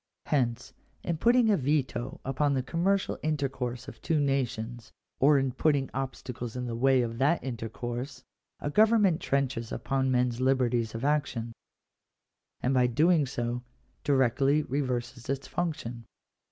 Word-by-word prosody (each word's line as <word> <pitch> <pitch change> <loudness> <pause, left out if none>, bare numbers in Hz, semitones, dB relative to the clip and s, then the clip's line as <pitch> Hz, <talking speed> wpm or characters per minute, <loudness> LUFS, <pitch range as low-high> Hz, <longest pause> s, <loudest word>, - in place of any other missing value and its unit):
Hence, 125 -4 0 0.3
in 170 -2 -1
putting 235 0 +4
a 200 - +4
veto 135 -2 -1
upon 140 +2 +1
the 130 - 0
commercial 185 +7 0
intercourse 135 -5 -2
of - - -10
two 160 -2 +1
nations, 125 -4 -2 0.3
or 145 +2 +6
in 135 -1 +1
putting 140 0 +1
obstacles 125 -3 -5
in 125 0 -3
the 120 -1 -3
way 130 +1 +3
of 115 0 -4
that 150 +6 +2
in 130 -3 -3
tercourse, 120 +4 -5 0.4
a 145 - -3
government 210 -3 +4
trenches 130 -4 -1
upon 135 -1 -1
men 125 -1 +3
s 120 0 -6
liberties 125 -4 +1
of 115 +4 -3
action; 130 -6 0 1.1
and 130 - +1
by 125 -1 +4
so - - -4
doing 135 -6 +2 0.4
directly 140 +2 +3
reverses 125 -3 -3
its 135 -1 -2
function. 145 -9 -3
130 Hz, 145 wpm, -29 LUFS, 120-145 Hz, 1.1 s, or